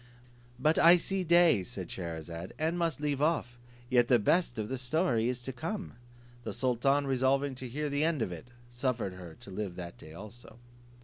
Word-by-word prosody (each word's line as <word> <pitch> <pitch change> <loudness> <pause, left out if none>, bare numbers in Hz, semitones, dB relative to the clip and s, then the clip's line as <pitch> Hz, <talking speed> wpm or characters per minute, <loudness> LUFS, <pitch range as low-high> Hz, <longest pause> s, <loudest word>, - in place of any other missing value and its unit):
"But 155 +5 +2
I 170 +2 +8
see 190 +2 -1
day," 170 - +5
said 90 0 -7
Scheherazade, 85 0 -6
"and 160 +2 0
must 170 -3 -1
leave 145 -2 -1
off; 145 -6 0 0.3
yet 120 -1 +3
the 125 - +5
best 120 - +1
of 110 -1 -2
the 130 +2 -3
story 125 -4 +1
is 125 -1 -3
to 130 - -4
come." 170 - -5 0.5
The - - -4
sultan 130 +3 +1
resolving 135 +1 +1
to 130 - -5
hear 150 +5 -3
the 145 +1 0
end 155 -6 +1
of 95 - -4
it, 85 +7 -8 0.2
suffered 120 -5 -2
her 90 -3 -10
to 100 - -11
live 95 -2 -4
that 85 -1 -8
day 80 +1 -12
also. 110 +4 -11
125 Hz, 190 wpm, -31 LUFS, 105-150 Hz, 0.5 s, I